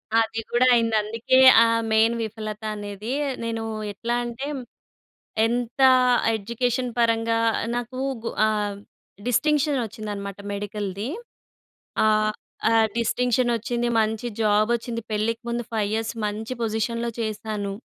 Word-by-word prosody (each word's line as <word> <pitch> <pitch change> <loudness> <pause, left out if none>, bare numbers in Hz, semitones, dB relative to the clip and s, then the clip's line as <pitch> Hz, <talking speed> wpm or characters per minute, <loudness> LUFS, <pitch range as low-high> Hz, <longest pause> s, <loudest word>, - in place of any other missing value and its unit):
అది 225 0 +2
గూడా 245 +2 +3
అయింది. 230 -2 +2
అందుకే 230 +4 +1 0.3
ఆ - - +4 0.3
మెయిన్ 220 +1 +4
విఫలత 215 0 -6
అనేది. 205 +3 -5 0.3
నేను 225 -1 -3 0.3
ఎట్లా 235 +4 -2
అంటే 240 +3 -5 1.0
ఎంత 240 +2 -2 0.6
ఎడ్యుకేషన్ 245 +4 -1
పరంగా 230 -1 +2 0.4
నాకు 245 +1 -4 0.2
గు 230 - -3 0.2
ఆహ్, 210 -2 -1 0.5
డిస్టింక్షన్ 295 +3 +2
వచ్చిందన్నమాట 205 -2 -6
మెడికల్‌ది. 205 +1 -4 1.0
ఆహ్, 215 0 +3 0.4
ఆహ్, 225 -1 +5
డిస్టింక్షన్ 245 +1 +1
వచ్చింది, 240 +2 -2
మంచి 220 +2 -1 0.2
జాబ్ 215 +1 +3
వచ్చింది. 230 0 -3
పెళ్ళికి 225 +3 -1
ముందు 235 0 -2
5 220 -2 +1
ఇయర్స్ 225 0 -1
మంచి 215 +3 -4
పొజిషన్‌లో 230 +1 -1
చేశాను. 215 -2 -3
225 Hz, 115 wpm, -24 LUFS, 215-235 Hz, 1.0 s, ఆహ్